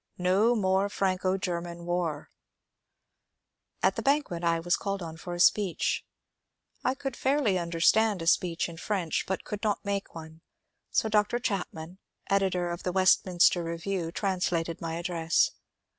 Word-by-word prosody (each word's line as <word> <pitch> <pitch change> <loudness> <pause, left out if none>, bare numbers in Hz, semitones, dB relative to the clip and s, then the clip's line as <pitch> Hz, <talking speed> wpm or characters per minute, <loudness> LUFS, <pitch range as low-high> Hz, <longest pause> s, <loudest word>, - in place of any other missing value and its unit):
No 195 +7 +3
more 190 -1 +1
Franco 190 -1 0
German 170 -2 -4
war 175 -4 -2
I - - -14
At - - -1
the - - -1
banquet 275 - 0
I 165 -1 +2
was 170 +1 +1
called 195 -1 -3
on 160 -1 -7
for 175 +2 -6
a - - -7
speech. 190 0 +2 0.8
I 255 +1 +1
could 270 -2 -5
fairly 265 -10 +1
understand 180 +5 +2
a - - -5
speech 170 0 +2
in 170 -1 -10
French 180 -3 -1
but 190 - -2 0.2
not 205 -1 -1
make 200 -2 -3
one, 160 0 -10 0.5
so - - +1
Dr. 210 +2 +2
Chapman, 180 -5 -4 0.3
editor 185 -3 +1
of 170 - -5
the 180 - -2
'^Westminster 185 -1 +4
Review," 170 +1 -3
translated 180 -4 -1
my 165 -1 -3
address. 170 -1 +1
180 Hz, 145 wpm, -28 LUFS, 170-200 Hz, 0.8 s, ^Westminster